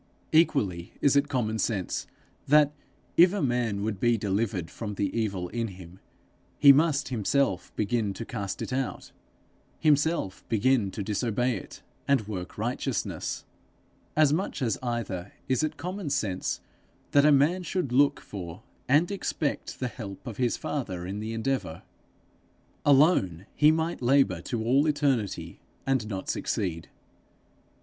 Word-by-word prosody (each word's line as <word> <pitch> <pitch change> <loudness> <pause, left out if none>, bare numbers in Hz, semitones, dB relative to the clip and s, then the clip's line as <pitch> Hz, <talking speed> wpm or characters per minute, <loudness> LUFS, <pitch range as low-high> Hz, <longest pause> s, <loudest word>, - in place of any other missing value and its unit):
Equally 100 - +2
is 140 -1 +3
it 140 +1 +3
common 110 -5 -1
sense 95 -3 -1 0.4
that, 150 0 +5 0.5
if 175 +2 +7
a 205 - -1
man 120 -6 0
would 105 -3 -2
be 120 +1 +3
delivered 100 -3 -1
from 105 -3 -5
the 100 -1 -1
evil 100 -6 -1
in 115 +3 -2
him, 90 -2 -11 0.6
he 140 - +9
must 145 -2 +2
himself 120 -4 0
begin 105 0 0
to 115 - -5
cast 100 -5 -4
it - - -5
out, 130 0 -3 0.7
himself 150 - +1
begin 115 -1 +2
to 100 +1 -5
disobey 115 +4 0
it, 95 - -9 0.2
and 135 -7 +2
work 95 -4 -6
righteousness. - - -2 0.7
As 150 -2 +5
much 165 -4 -2
as 115 -5 0
either 115 -7 -3
is 130 -1 +2
it 155 0 -2
common 180 -2 -4
sense 110 -10 -1 0.5
that 145 - +5
a 150 - +6
man 150 +6 +4
should 175 -5 -2
look 140 +3 +4
for 90 0 -8 0.3
and 155 +7 +4
expect 165 -6 -3
the 125 - -1
help 100 -4 -8
of 120 -5 -6
his 125 -2 +1
Father 95 -12 -4
in 100 +3 -4
the 110 +1 -4
endeavour. 115 -7 -2 1.0
Alone, 135 - +4
he 150 - +6
might 160 0 -1
labour 125 -9 +3
to 110 +4 -3
all 135 +6 +3
eternity 140 -9 0 0.3
and 130 -5 +1
not 95 -3 -5
succeed. 85 -5 -2
120 Hz, 145 wpm, -27 LUFS, 100-145 Hz, 1.0 s, he